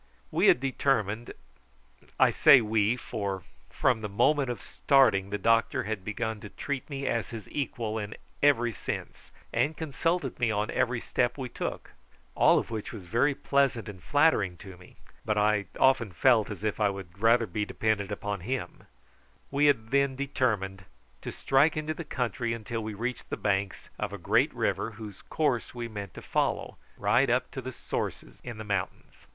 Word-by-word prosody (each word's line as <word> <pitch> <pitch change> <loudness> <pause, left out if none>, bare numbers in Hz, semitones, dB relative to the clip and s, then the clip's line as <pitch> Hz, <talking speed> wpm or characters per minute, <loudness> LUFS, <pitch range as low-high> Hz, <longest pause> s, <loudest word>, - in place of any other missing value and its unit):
We - - +3
had - - +6
determined 120 -4 0 0.9
I - - +6
say 140 - +7
we, 110 +1 +1
for 100 -7 -4 0.3
from 120 -3 +1
the 105 - -4
moment 130 +6 +2
of 120 - -3
starting 110 -9 +3
the 105 - -2
doctor 115 +3 +2
had 105 -2 -4
begun 110 +2 -3
to 105 - -9
treat 140 +4 -4
me 140 -1 -4
as 115 -2 -1
his 110 -4 -8
equal 115 -5 -2
in 105 0 -5 0.3
every 120 -5 +4
sense, 95 - -6 0.2
and 140 +7 +1
consulted 160 -1 -1
me 120 -2 +2
on 105 0 -1
every 125 -2 0
step 120 +2 0
we 130 -2 -4
took; - - -5 0.4
all - - +5
of - - -2
which 110 -2 -4
was 105 -6 -9
very 120 +9 +2
pleasant 140 -5 +1
and 95 -3 -9
flattering 145 - +2
to 95 -1 -11
me; 90 0 -17 0.3
but 105 -1 0
I 105 -1 +2
often 125 -6 +4
felt 115 +3 +3
as 105 -1 -7
if 110 -1 -1
I 105 -1 +3
would 95 -2 -8
rather 115 +2 +4
be 105 +2 -2
dependent 105 -1 -1
upon 100 0 -3
him 125 +9 -5 0.6
we 145 +1 +3
had 115 -5 +2
then 140 -1 +2
determined 110 -9 -1 0.4
to - - -5
strike 145 +4 +2
into 155 0 -2
the 170 - -6
country 120 -5 -2
until 115 0 -4
we 110 -1 -5
reached 120 +4 -4
the - - -3
banks 100 -1 -1
of - - -2
a - - -4
great - - +2
river, 115 - -1
whose 105 -3 -9
course 130 -7 -1
we 120 -1 -4
meant 100 -5 -7
to - - -9
follow - - -1 0.2
right 120 +6 +3
up 125 +1 +1
to 130 - -5
the 130 +1 -6
sources - - -5
in 120 -2 -7
the 110 - -6
mountains. 100 -3 -4
115 Hz, 180 wpm, -28 LUFS, 105-130 Hz, 0.9 s, say